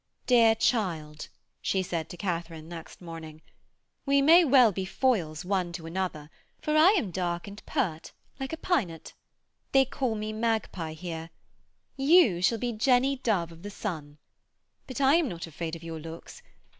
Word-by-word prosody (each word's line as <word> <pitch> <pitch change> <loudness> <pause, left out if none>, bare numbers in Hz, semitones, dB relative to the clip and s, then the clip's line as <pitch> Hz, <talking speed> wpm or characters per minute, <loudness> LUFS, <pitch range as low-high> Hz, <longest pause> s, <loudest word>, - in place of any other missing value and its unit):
'Dear 230 -3 +5
child,' 165 -10 -1 0.3
she 190 -1 0
said 165 -3 -3
to 175 - -9
Katharine 165 -4 -4
next 165 0 -10
morning, 160 -2 -9 0.6
'we 280 0 +4
may 335 +5 +8
well 255 -6 +6
be 190 0 -3
foils 185 - 0
one 185 -2 0
to 170 -2 -7
another, 165 -3 -4 0.3
for 305 - -1
I 330 +6 +7
am 210 - -1
dark 175 0 -2
and 200 +1 -10
pert, 190 - -2 0.3
like 270 0 -4
a 320 - -4
pynot. 230 - -2 0.6
They 270 0 +6
call 255 -3 -2
me 215 0 -4
Mag 225 0 0
Pie 165 -3 -5
here. 165 0 -6 0.7
You 275 - +5
shall 210 +5 +3
be 245 +2 -2
Jenny 255 +4 +2
Dove 195 -10 0
of 165 0 -14
the 205 - -6
Sun. 155 -8 -6 0.7
But 255 - -6
I 275 +4 +5
am 330 -6 +1
not 170 -3 -6
afraid 165 0 -5
of 165 - -11
your 165 -1 -6
looks. 165 - -10
190 Hz, 170 wpm, -28 LUFS, 165-255 Hz, 0.7 s, may